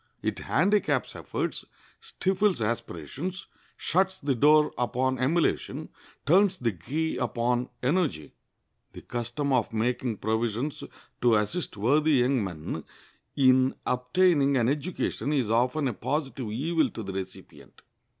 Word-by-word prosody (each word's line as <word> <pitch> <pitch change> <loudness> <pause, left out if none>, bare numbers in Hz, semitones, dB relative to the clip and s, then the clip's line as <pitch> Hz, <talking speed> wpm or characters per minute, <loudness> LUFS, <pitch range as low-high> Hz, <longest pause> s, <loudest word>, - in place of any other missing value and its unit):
It - - -1
handicaps 205 +2 +1
efforts, - - -3 0.4
stifles 200 - 0
aspirations, 115 - -4 0.3
shuts 190 +2 +1
the 140 -5 0
door 150 +4 +4
upon 130 +1 0
emulation, 155 +6 0 0.4
turns 190 +5 +4
the 120 -2 0
key 145 - -3
upon 120 +1 0
energy." 135 - 0 0.6
The - - -10
custom 120 +4 -2
of 125 -4 +1
making 120 0 -1
provisions 115 +6 -2 0.4
to 120 -2 +5
assist 110 - -1
worthy 150 +9 +3
young 130 -2 +3
men 85 -5 -5 0.5
in 130 -1 +4
obtaining 140 +2 +2
an 120 -1 +2
education 145 -3 -2
is 125 -7 0
often 125 +5 +2
a 125 - -1
positive 135 -1 -3
evil 160 +8 +1
to 110 - -7
the 95 -1 -6
recipient. 95 -1 -9
130 Hz, 120 wpm, -27 LUFS, 115-155 Hz, 0.6 s, to